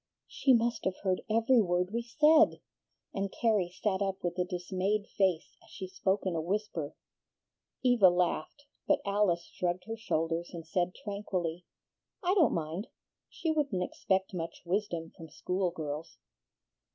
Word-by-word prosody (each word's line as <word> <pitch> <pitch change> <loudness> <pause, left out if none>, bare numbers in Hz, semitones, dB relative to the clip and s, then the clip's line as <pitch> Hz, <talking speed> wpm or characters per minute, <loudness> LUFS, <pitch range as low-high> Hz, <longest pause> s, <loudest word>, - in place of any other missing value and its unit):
"She 270 - +2
must 235 0 0
have 190 0 0
heard 185 -2 +1
every 230 +3 +4
word 180 -1 0
we 235 - 0
said!" 305 +6 +5 0.5
and 195 0 -2
Carrie 210 -6 +1
sat 200 -3 +1
up 195 -1 -2
with 175 -1 -1
a - - +4
dismayed 185 +3 -1
face 190 -6 0
as - - -20
she 190 - -7
spoke 190 +2 -1
in 185 -3 0
a 160 - 0
whisper. 175 -4 -2 0.9
Eva 245 -7 +6
laughed, 175 - -1 0.2
but - - +3
Alice 200 -4 +2
shrugged 180 0 -1
her 225 +4 -5
shoulders, 170 -5 -2
and 165 -1 -7
said 180 +2 -1
tranquilly, 180 -5 -3 0.6
"I 360 +1 +3
don't 360 -7 +4
mind. 165 +6 -3 0.4
She 325 - -2
wouldn't 280 -13 0
expect 190 +1 -1
much 165 -2 -5
wisdom 170 -3 -2
from 160 -1 -11
school 180 +4 -1
girls." 155 -2 -6
190 Hz, 150 wpm, -31 LUFS, 175-215 Hz, 0.9 s, Eva